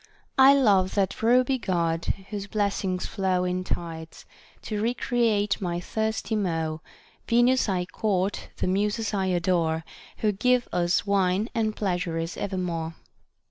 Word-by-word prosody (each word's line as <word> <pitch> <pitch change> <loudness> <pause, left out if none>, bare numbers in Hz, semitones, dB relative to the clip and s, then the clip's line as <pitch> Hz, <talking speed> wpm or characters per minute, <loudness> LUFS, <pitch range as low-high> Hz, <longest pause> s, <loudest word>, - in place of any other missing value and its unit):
— - - -42
I 280 - +7
love 200 -8 +3
that 195 -2 0
ruby 250 +3 +3
God, 170 -5 -1 0.3
whose 200 -1 -4
blessings 200 -3 -1
flow 190 -3 0
In 180 0 -1
tides, 165 -2 -6 0.4
to 210 -2 -3
recreate 225 -3 +1
my 175 -2 -2
thirsty 220 +4 -2
maw; 165 -6 -1 0.5
Venus 240 0 +3
I 180 -2 0
court, 195 0 -1
the - - -1
Muses 210 +4 0
I 190 -2 0
adore, 170 -3 +1 0.3
Who 215 - +1
give 245 +5 +2
us 175 +3 +1
wine 200 +2 +1
and 220 -3 0
pleasures 175 -4 -2
evermore. 175 -4 -3
195 Hz, 135 wpm, -26 LUFS, 180-220 Hz, 0.5 s, I